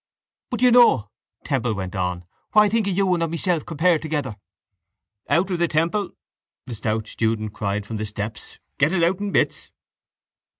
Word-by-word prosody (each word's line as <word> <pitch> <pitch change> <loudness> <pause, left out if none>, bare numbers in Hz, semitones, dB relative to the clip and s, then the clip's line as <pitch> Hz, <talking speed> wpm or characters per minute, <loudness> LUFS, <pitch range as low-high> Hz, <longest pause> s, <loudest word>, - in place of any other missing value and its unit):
—But 245 -2 -4
do - - +5
you 250 - +6
know, 130 - +5 0.3
Temple 125 -6 0
went 95 -2 -5
on, 90 -1 -2 0.3
what 210 - +7
I 210 - +2
think 220 -1 +1
of 190 -2 -1
you 195 -2 +3
and 170 - 0
of 165 - 0
myself 170 0 0
compared 165 0 +2
together? 145 -7 -3 0.9
—Out 185 +3 +2
with 175 -1 -1
it, 170 - +2
Temple! 170 +6 0 0.5
the 125 - -7
stout 110 0 -2
student 110 -2 -2
cried 100 -1 -2
from 110 +1 -5
the 110 - -3
steps. 105 +2 -7 0.2
Get 145 +4 +3
it 175 -3 +2
out 180 +3 +2
in 205 -1 -3
bits! - - 0
155 Hz, 185 wpm, -23 LUFS, -, 0.9 s, what